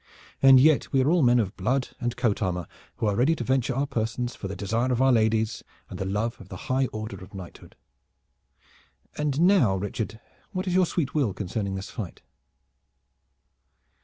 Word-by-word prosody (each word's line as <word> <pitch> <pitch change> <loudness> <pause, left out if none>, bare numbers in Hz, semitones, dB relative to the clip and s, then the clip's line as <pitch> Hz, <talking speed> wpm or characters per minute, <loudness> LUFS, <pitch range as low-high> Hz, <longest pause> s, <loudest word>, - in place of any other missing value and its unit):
And 135 -1 +8
yet 155 +2 +4
we 135 - +3
are 145 - +2
all 175 -1 +3
men 125 -2 +5
of 100 -3 -1
blood 125 +7 0
and 120 -1 -3
coat 115 -4 0
armor, 90 -3 -1 0.3
who - - -2
are 105 -1 +1
ready 135 +9 +3
to 125 - -4
venture 130 0 0
our 135 +2 +1
persons 120 0 -2
for 100 - -6
the 100 - -5
desire 115 +5 -1
of 125 - 0
our 135 0 +4
ladies 110 -1 +1 0.3
and - - -7
the 95 - -2
love 105 +4 -2
of 95 - -14
the 95 - -7 0.2
high 130 0 +2
order 110 -4 -7
of 100 +2 -13
knighthood. 90 -3 -11 1.4
And 150 -1 -1
now, 175 - +4
Richard, 105 +3 -4 0.3
what 185 0 -2
is 180 - -1
your 185 -1 +4
sweet 155 -6 -2
will 130 -11 0
concerning 100 0 -3
this 95 +1 -6
fight?" 105 -8 -7
115 Hz, 190 wpm, -26 LUFS, 100-135 Hz, 1.4 s, And